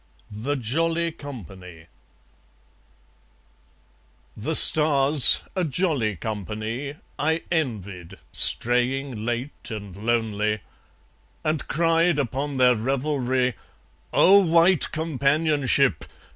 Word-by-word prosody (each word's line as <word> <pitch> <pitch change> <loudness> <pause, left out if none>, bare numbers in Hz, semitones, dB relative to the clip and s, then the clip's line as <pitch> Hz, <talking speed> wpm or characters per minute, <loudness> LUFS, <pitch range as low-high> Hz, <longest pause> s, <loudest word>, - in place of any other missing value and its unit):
The 115 +8 -4
Jolly 165 +7 -2
Company 95 - -12 2.5
The - - -4
stars, 145 -2 +7
a 185 - -1
jolly 145 - -2
company, 110 - -6 0.2
I 160 +2 -1
envied, 100 - -5
straying 125 0 0
late 120 +4 -4
and 100 -5 -9
lonely; 105 -1 -2 0.8
And 155 -2 -3
cried 165 +1 0
upon 140 +1 -4
their 125 -1 +3
revelry: 130 +1 -2 0.6
"O 200 +2 +5
white 170 0 +2
companionship! 145 - 0
135 Hz, 80 wpm, -22 LUFS, 110-155 Hz, 2.5 s, stars